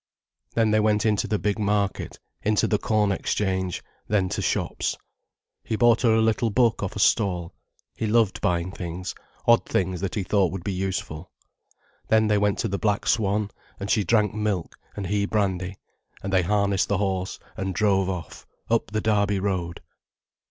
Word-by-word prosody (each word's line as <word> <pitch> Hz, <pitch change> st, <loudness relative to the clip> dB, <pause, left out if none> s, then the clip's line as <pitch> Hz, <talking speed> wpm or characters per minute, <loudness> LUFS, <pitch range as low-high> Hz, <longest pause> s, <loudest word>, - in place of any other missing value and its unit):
Then 115 Hz, -2 st, +3 dB
they 110 Hz, -, +4 dB
went 105 Hz, 0 st, +2 dB
into 105 Hz, -2 st, +2 dB
the 105 Hz, -, 0 dB
big 105 Hz, +1 st, -1 dB
market, 100 Hz, -1 st, -1 dB, 0.2 s
into 105 Hz, 0 st, +2 dB
the 105 Hz, -, +1 dB
corn 105 Hz, -3 st, +1 dB
exchange, 95 Hz, -2 st, -1 dB, 0.2 s
then 95 Hz, -3 st, +1 dB
to -, -, -2 dB
shops. -, -, -1 dB, 0.7 s
He 110 Hz, -, -2 dB
bought 120 Hz, +1 st, +4 dB
her 115 Hz, -3 st, +4 dB
a 110 Hz, -, +3 dB
little 110 Hz, +1 st, +2 dB
book 115 Hz, +1 st, +2 dB
off 95 Hz, -, -3 dB
a -, -, -4 dB
stall. 90 Hz, -5 st, +2 dB, 0.4 s
He 110 Hz, -, -2 dB
loved 110 Hz, -2 st, +2 dB
buying 90 Hz, +1 st, 0 dB
things, 90 Hz, 0 st, -5 dB, 0.3 s
odd 120 Hz, 0 st, +5 dB
things 90 Hz, -1 st, -1 dB
that 95 Hz, -, -2 dB
he 105 Hz, -, -1 dB
thought 95 Hz, -1 st, +2 dB
would 95 Hz, -3 st, -5 dB
be 100 Hz, -, -2 dB
useful. 90 Hz, -3 st, -4 dB, 0.8 s
Then 110 Hz, 0 st, +4 dB
they 105 Hz, -1 st, +3 dB
went 105 Hz, -1 st, +1 dB
to -, -, -1 dB
the 100 Hz, -1 st, -2 dB
"Black 105 Hz, -2 st, 0 dB
Swan", 105 Hz, -1 st, +1 dB, 0.3 s
and 100 Hz, +1 st, -3 dB
she 105 Hz, -, +3 dB
drank 105 Hz, +2 st, +2 dB
milk 105 Hz, -5 st, -2 dB, 0.2 s
and 100 Hz, -, -4 dB
he 100 Hz, +2 st, 0 dB
brandy, 95 Hz, -3 st, -1 dB, 0.5 s
and 95 Hz, 0 st, -3 dB
they 95 Hz, -, +5 dB
harnessed 100 Hz, +1 st, +1 dB
the 100 Hz, -, +1 dB
horse 95 Hz, -2 st, -1 dB, 0.2 s
and 95 Hz, 0 st, -3 dB
drove 95 Hz, -3 st, +2 dB
off, 90 Hz, -4 st, -6 dB, 0.2 s
up 115 Hz, -2 st, +2 dB
the 110 Hz, +1 st, -1 dB
Derby 100 Hz, -2 st, +2 dB
Road. 90 Hz, -4 st, -2 dB
100 Hz, 180 wpm, -25 LUFS, 95-105 Hz, 0.8 s, odd